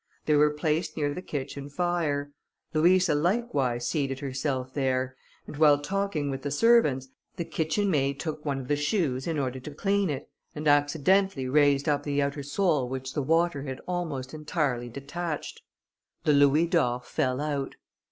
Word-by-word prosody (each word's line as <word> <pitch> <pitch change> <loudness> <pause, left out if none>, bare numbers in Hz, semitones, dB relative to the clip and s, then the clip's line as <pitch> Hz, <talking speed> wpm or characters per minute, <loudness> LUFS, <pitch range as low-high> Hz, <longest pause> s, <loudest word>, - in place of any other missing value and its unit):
They 155 - +2
were 150 +1 +5
placed 155 +3 -1
near 145 -2 0
the 180 - -5
kitchen 140 -3 -5
fire; 150 -3 -1 0.4
Louisa 175 +2 +4
likewise 145 - 0
seated 135 -4 -1
herself 130 -1 -3
there, 130 -2 0 0.3
and - - -9
while 150 -2 +6
talking 170 -3 -2
with 135 0 -4
the 145 - -3
servants, 145 - +3 0.3
the 170 - -3
kitchen 165 +5 0
maid 140 -2 +1
took 155 -2 -4
one 140 -2 -2
of 125 - -9
the 145 - +2
shoes 145 - 0
in 165 -2 -1
order 130 -2 -2
to 150 +4 -8
clean 200 +1 +1
it, 140 -3 -4 0.3
and 150 0 -3
accidentally 145 +2 +3
raised 145 +1 +3
up 145 -1 +2
the 145 -1 -1
outer 140 +1 -1
sole 145 -3 0
which 130 0 -5
the 150 - -1
water 165 +1 +1
had 135 -2 -5
almost 160 -8 -3
entirely 150 -6 -2
detached. 145 +5 -5 0.6
The 150 - +3
louis 145 +3 +5
d'or 140 -8 +1
fell 130 +1 -1
out. 145 -2 -2
145 Hz, 165 wpm, -27 LUFS, 135-165 Hz, 0.6 s, while